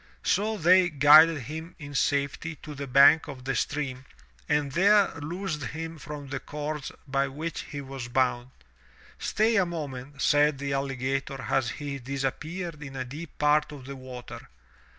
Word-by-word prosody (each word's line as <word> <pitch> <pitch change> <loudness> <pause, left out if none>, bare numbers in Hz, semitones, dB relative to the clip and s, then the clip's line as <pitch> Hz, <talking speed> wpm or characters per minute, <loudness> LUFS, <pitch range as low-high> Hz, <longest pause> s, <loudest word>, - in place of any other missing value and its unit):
So 215 +2 +1
they 180 +1 +5
guided 155 +1 +7
him 160 +7 -7
in 145 -3 -9
safety 140 +3 0
to 150 - -7
the 140 -1 -6
bank 140 +5 +6
of 130 -3 -9
the 135 - 0
stream 135 -3 -2 0.4
and 150 -2 +1
there 200 +6 +4
loosed 160 +1 -4
him 160 +5 -6
from 145 -1 -8
the - - -3
cords 150 -1 -5 0.2
by 135 0 +1
which 155 +5 -5
he 145 -2 -5
was 135 -2 -7
bound. 125 0 0 0.7
"Stay 225 +1 +2
a 195 - +5
moment," 140 -4 -6
said 145 0 +3
the 140 0 -3
alligator 135 0 -2
as 130 -4 0
he 140 +4 -5
disappeared 150 +6 -4
in 135 -2 -8
a 130 -1 -3
deep 150 +5 -9
part 150 0 +3
of 140 -3 -10
the 140 +1 -7
water. 130 -2 -10
145 Hz, 160 wpm, -27 LUFS, 135-160 Hz, 0.7 s, guided